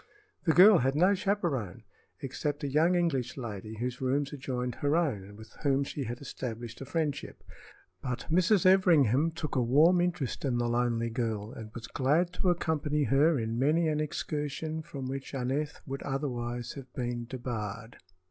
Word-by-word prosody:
The 160 - +4
girl 190 +3 +8
had 135 +2 +1
no 180 +6 +5
chaperone 175 - -1 0.4
except 145 +3 -3
a - - 0
young 160 +6 +3
English 165 -4 0
lady 110 -3 -6
whose 125 +2 -3
rooms 135 +2 0
adjoined 125 -3 -3
her 145 +1 +2
own 145 - +1
and 100 +1 -13
with 110 0 -13
whom 140 -2 +2
she 140 0 -4
had 120 +2 -5
established 120 -4 -6
a - - -5
friendship; 155 -4 -3 0.6
but 125 -2 -4
Mrs. 185 +3 +3
Everingham 165 - +5
took 160 -2 -5
a 130 - +3
warm 155 +9 +5
interest 175 -7 -2
in 130 -4 0
the 120 0 0
lonely 120 -1 0
girl 110 -3 -2
and 110 -4 -9
was 115 -1 -6
glad 155 +9 +1
to 180 - 0
accompany 155 -4 0
her 145 +3 +4
in 115 0 -2
many 155 +5 +3
an 150 -1 0
excursion 155 +1 -3
from 145 -5 -7
which 135 +1 -5
Aneth 135 +4 -2
would 135 0 -5
otherwise 120 -4 -3
have 135 -3 -10
been 120 -1 -3
debarred. 115 -3 -5
135 Hz, 170 wpm, -30 LUFS, 120-160 Hz, 0.6 s, girl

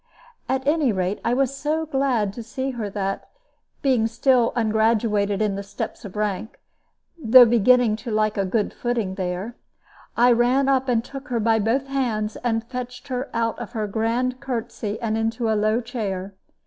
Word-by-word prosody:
At 265 0 0
any 295 -4 +3
rate, 190 0 -2
I 235 +1 +1
was 275 0 +1
so 310 +3 -1
glad 265 -9 0
to 235 - -7
see 260 +4 -4
her 230 -5 -4
that, 195 -1 -3 0.5
being 250 -5 +3
still 235 +1 +2
ungraduated 215 -2 +1
in 210 -2 0
the 200 - -4
steps 200 +4 -6
of 200 -2 -9
rank 210 +2 -3 0.6
(though 245 +2 +9
beginning 235 0 +4
to 225 +2 -8
like 215 -1 +1
a 200 - 0
good 205 +2 -1
footing 235 -6 -2
there), 185 +4 -4 0.6
I 245 +1 +6
ran 245 +3 +3
up 265 -1 +2
and 235 -1 +1
took 275 +2 -9
her 240 -2 -1
by 225 0 +2
both 230 +6 +1
hands, 235 -6 -1
and 225 -2 -1
fetched 250 +2 -7
her 255 +2 -3
out 230 0 -1
of 240 0 -7
her 220 -3 -1
grand 235 +4 -1
courtesy 230 -5 -4
and 220 -1 0
into 225 0 -1
a - - +3
low 215 +2 +1
chair. 200 -6 -4
230 Hz, 175 wpm, -23 LUFS, 215-255 Hz, 0.6 s, though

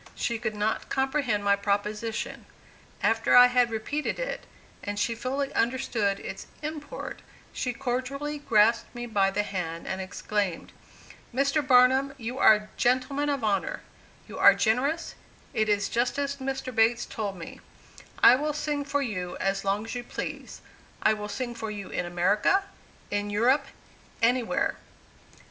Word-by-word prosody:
She 235 -1 -2
could 220 -2 -3
not 210 +1 -1
comprehend 265 -6 0
my 200 0 +4
proposition. 210 +2 -2 0.6
After 225 +2 +3
I 245 0 +10
had 250 -1 +3
repeated 230 +7 -2
it, - - -4 0.4
and 205 0 -4
she 230 +3 0
fully 270 +4 -3
understood 230 -5 0
its - - -7 0.2
import, 300 -1 -6 0.3
she 250 - -2
cordially 275 +4 -3
grasped 230 -4 +3
me 240 0 -4
by 200 -4 +2
the 205 +2 0
hand, 170 -5 -4
and 190 0 -3
exclaimed, 190 -1 -3 0.6
"Mr. 275 +4 +1
Barnum, 265 +1 +4
you 245 +1 -5
are - - +8
a 210 0 -7
gentleman 260 +4 +1
of 280 -4 -1
honor: 220 - 0 0.5
you - - -8
are - - +8
generous; 265 +9 0 0.4
it 215 0 +1
is 205 -1 +2
just 240 +3 0
as 280 0 -1
Mr. 265 -1 -4
Bates 230 +1 +3
told 205 -4 -4
me; 165 - -9 0.6
I - - +10
will 300 +2 -1
sing 295 -1 -2
for 285 0 -1
you 180 -7 -4
as 195 0 -1
long 200 +2 0
as 225 - -6
you 245 -1 -4
please; - - -6 0.4
I 215 - +5
will 210 -1 -5
sing 240 +3 -4
for 225 -2 -5
you 205 -2 -6
in 175 - -3
America 200 - +2 0.5
in 205 0 -1
Europe 255 +7 +2 0.5
anywhere!" 240 0 +1
235 Hz, 155 wpm, -27 LUFS, 205-270 Hz, 0.6 s, I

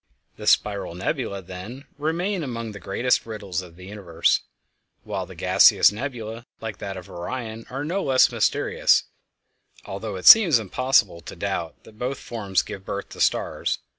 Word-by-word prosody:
The - - -8
spiral 100 -4 +2
nebulæ, 100 - -3
then, 95 +9 -9
remain 175 +5 -1
among 115 -4 -5
the 100 - -9
greatest 120 +6 0
riddles 100 -5 -4
of 85 -2 -13
the 90 +1 -12
universe, 95 -5 0 0.6
while - - -4
the - - -12
gaseous - - +5
nebulæ, 115 -1 -6
like 110 -3 -6
that 95 -1 -5
of 90 - -9
Orion, 110 +5 -6
are 135 +3 -4
no 185 +6 -1
less 130 -5 +4
mysterious, - - +2 0.8
although 100 +1 -5
it 90 - -7
seems 190 - +9
impossible 110 -4 +1
to - - -10
doubt 85 -1 -4
that 110 0 -17
both 125 +2 -2
forms 100 -5 -2
give 95 - -8
birth 100 +1 -5
to - - -8
stars. - - 0
110 Hz, 160 wpm, -24 LUFS, 95-130 Hz, 0.8 s, seems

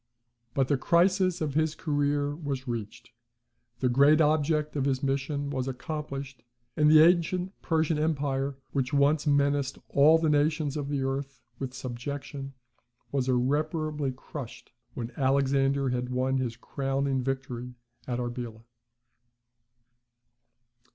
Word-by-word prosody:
But 135 -2 +2
the 140 - +2
crisis 180 +3 +3
of 150 -3 -1
his 155 0 +1
career 145 -2 0
was 140 -4 -4
reached; 115 0 -5 0.7
the 130 - +3
great 140 +5 +5
object 155 0 +2
of 140 -2 0
his 135 -1 0
mission 140 +1 -1
was 130 -2 -2
accomplished; 135 -1 -5 0.3
and 150 0 +4
the 155 0 +8
ancient 180 +2 +2
Persian 160 -2 +1
empire, 140 -3 -1
which 130 -2 -1
once 145 +2 +3
menaced 140 -1 +2
all 150 +3 +6
the 160 0 0
nations 150 0 +1
of 145 -2 -3
the 140 -2 -1
earth 135 -2 -4 0.2
with 130 -1 -5
subjection, 135 +2 -6 0.6
was 135 -2 0
irreparably 150 +3 0
crushed, 130 -1 -9 0.2
when 120 -1 -4
Alexander 135 0 +2
had 125 0 -2
won 130 +1 0
his 120 -3 -3
crowning 135 +1 -1
victory 125 -2 -4 0.3
at 125 -2 -1
Arbela. 120 -2 -5
140 Hz, 125 wpm, -28 LUFS, 130-150 Hz, 0.7 s, the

